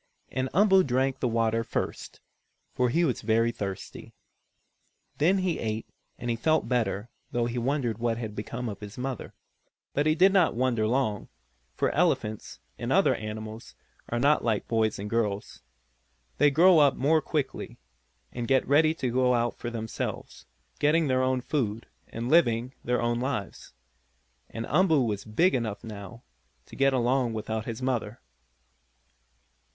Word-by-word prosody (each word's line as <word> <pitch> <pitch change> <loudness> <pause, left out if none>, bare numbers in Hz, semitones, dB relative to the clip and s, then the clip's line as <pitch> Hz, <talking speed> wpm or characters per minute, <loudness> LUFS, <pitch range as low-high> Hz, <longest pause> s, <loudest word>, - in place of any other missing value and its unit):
And 130 0 -2
Umboo 190 0 +5
drank 130 0 0
the 125 - 0
water 115 -1 +1
first, - - -4 0.5
for 125 -1 +1
he 170 +7 +2
was 130 -7 -1
very 115 +1 +2
thirsty. 100 -4 -7 1.0
Then 180 +6 +4
he 185 -3 -1
ate 110 0 -3 0.3
and 120 -1 -3
he - - 0
felt 155 +6 +1
better, 115 -2 -1 0.2
though 120 -1 0
he 120 +1 -2
wondered 120 -3 -1
what 115 -1 0
had 110 -3 -5
become 120 +4 -5
of 105 -3 -6
his 105 0 -9
mother. 130 -2 -5 0.6
But 145 +2 +1
he 155 - +3
did 190 +3 +5
not 180 - +3
wonder 120 -3 +1
long, 115 -4 0 0.5
for - - +1
elephants, 105 0 -1 0.2
and - - -3
other - - +4
animals, 110 +1 -7 0.3
are 120 - -1
not 145 +5 +3
like 110 -3 0
boys 110 -2 +1
and 100 - -5
girls. 105 -3 -2 0.8
They 145 - +6
grow 170 +4 +6
up 140 -2 +5
more 155 +4 +2
quickly, 150 -1 -3 0.5
and 120 -1 -4
get 135 -1 +2
ready 155 +3 +4
to 130 -6 -2
go 125 0 +3
about 120 0 0
for 120 - -4
themselves, 110 -2 -5 0.3
getting 150 +1 +3
their 130 0 +2
own 130 0 +1
food, 115 -6 -2 0.2
and 115 +1 -5
living 125 -5 +3
their 125 0 0
own 120 0 0
lives. 120 -7 -4 0.8
And 115 0 -5
Umboo 160 -6 +3
was 105 -3 -3
big 165 - +2
enough, 115 -5 -2
now, 105 +1 -9 0.4
to - - -13
get 135 0 +3
along 125 -1 +1
without 110 0 -3
his 115 +2 -5
mother. 120 -3 -2
120 Hz, 155 wpm, -27 LUFS, 110-135 Hz, 1.0 s, They